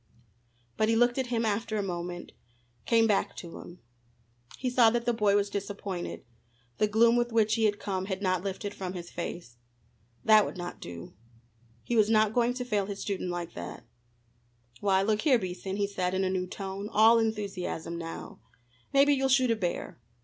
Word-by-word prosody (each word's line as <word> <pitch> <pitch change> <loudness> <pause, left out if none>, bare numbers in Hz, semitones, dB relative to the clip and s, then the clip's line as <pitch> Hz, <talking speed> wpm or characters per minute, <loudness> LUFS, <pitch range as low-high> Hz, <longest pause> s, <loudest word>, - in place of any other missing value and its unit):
But 215 - +2
he 225 - +3
looked 240 +2 +3
at 260 - -1
him 235 -1 0
after 215 +1 -1
a 205 - 0
moment, 175 -1 -5 0.6
came 230 -1 +4
back 210 -3 +1
to 170 -2 -8
him. 175 +1 -12 0.8
He 255 - -3
saw 245 -2 +5
that 235 +1 -1
the 240 - +2
boy 210 -3 +2
was 205 0 +2
disappointed. 200 -2 -5 0.5
The 210 - +4
gloom 230 +3 +4
with 240 0 0
which 220 -1 +3
he 225 0 +2
had 205 -1 +2
come 190 -2 -3
had 190 -1 -3
not 185 -3 0
lifted 200 +1 -4
from 185 -1 -5
his 175 -2 -7
face. 170 -7 -6 0.7
That 215 -1 +7
would - - -5
not 175 0 -6
do. 85 -1 -8 0.7
He 240 - -2
was 215 -1 +4
not 215 -1 +3
going 245 +1 +2
to 250 -1 -4
fail 205 -5 0
his 200 -1 -5
student 195 -3 -3
like 175 -1 -4
that. 85 0 -8 0.9
"Why, 195 -1 +2
look 215 +1 +1
here, 280 -5 +4
Beason," 190 -1 -4
he 200 0 +1
said 185 -2 -2
in 190 - +1
a 185 - 0
new 185 -1 -1
tone, 195 +2 -6
all 225 +2 +6
enthusiasm 200 -6 -3
now, 165 0 -7 0.5
"maybe 280 +1 +5
you'll 270 -1 +1
shoot 260 -2 +4
a - - +3
bear. 180 - -3
205 Hz, 190 wpm, -29 LUFS, 185-225 Hz, 0.9 s, That